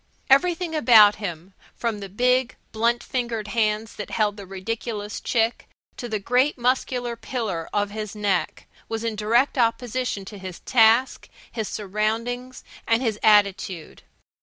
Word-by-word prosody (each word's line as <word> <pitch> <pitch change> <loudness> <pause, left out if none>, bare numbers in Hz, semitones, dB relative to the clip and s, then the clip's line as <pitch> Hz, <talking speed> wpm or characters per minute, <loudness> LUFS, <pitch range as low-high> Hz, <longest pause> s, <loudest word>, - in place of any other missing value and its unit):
Everything 340 +4 +3
about 225 -9 +6
him, 185 -2 -6 0.2
from 230 -3 -2
the 200 -1 -7
big, 250 +4 +1 0.2
blunt 235 +2 +1
fingered 235 -4 -3
hands 215 0 0
that 210 - -6
held 210 -2 0
the 200 -2 -10
ridiculous 210 +2 -5
chick 230 -1 0 0.3
to 240 - -6
the 220 - -1
great 250 +8 +1
muscular 245 -1 -1
pillar 220 -8 -4
of 205 -1 -1
his 215 0 -6
neck, 205 -3 -1 0.2
was 225 0 -3
in 230 -1 -2
direct 235 +6 +1
opposition 235 -2 -1
to 205 +1 -10
his 185 -2 -8
task, 230 +1 +3 0.2
his 220 -3 -3
surroundings, 225 +5 -3 0.2
and 230 +3 +2
his 220 -3 -1
attitude. 200 -5 +2
225 Hz, 140 wpm, -24 LUFS, 205-245 Hz, 0.3 s, about